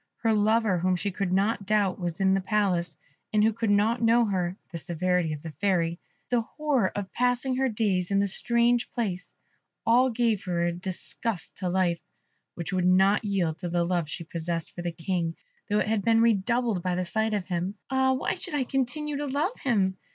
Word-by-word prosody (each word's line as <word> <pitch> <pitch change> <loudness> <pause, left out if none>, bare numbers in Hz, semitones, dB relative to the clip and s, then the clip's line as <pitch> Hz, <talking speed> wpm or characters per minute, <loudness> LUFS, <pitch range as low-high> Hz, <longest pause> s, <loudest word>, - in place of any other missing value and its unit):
Her 225 -1 +3
lover, 215 -2 +2
whom 185 +1 +2
she 200 +3 -2
could 190 -1 -2
not 200 +1 +1
doubt 205 -3 +1
was 175 -1 -3
in 190 0 +3
the 195 - +1
Palace, 185 -6 0 0.3
and 210 -1 +3
who 220 +1 +3
could 225 0 -2
not 215 +4 +2
know 230 +1 +4
her 185 -3 -1
the 170 - -3
severity 175 0 0
of 150 -1 -6
the 165 - -6
Fairy 170 0 0 0.3
the 245 -1 +3
horror 270 -4 0
of 200 -2 -5
passing 250 +1 +1
her 265 0 +2
days 200 -5 0
in 200 - +1
this 200 -1 +3
strange 235 0 +2
place 185 -7 -3 0.5
all 250 +3 +5
gave 230 -4 0
her 175 -2 0
a 175 - +1
disgust 185 +2 -4
to 185 -2 -2
life, 175 -2 +1 0.6
which 170 +2 -5
would 180 -1 +2
not 190 +3 +4
yield 180 -6 -1
to 180 - -4
the 175 0 +1
love 170 -3 -1
she 170 - -5
possessed 165 0 -4
for 175 - -7
the 175 0 -2
King, 165 0 -2 0.3
though 205 - +2
it 210 - +1
had 220 -1 +1
been 225 +3 +3
redoubled 230 -1 +2
by 180 0 -1
the 180 0 -1
sight 220 +4 0
of 200 -3 -2
him. 180 +2 -2 0.2
"Ah, 265 0 +3
why 260 - -1
should 345 -6 -3
I 280 - +1
continue 280 +3 -2
to 290 0 -3
love 295 - -1
him?" 195 -8 +1
200 Hz, 205 wpm, -27 LUFS, 180-230 Hz, 0.6 s, all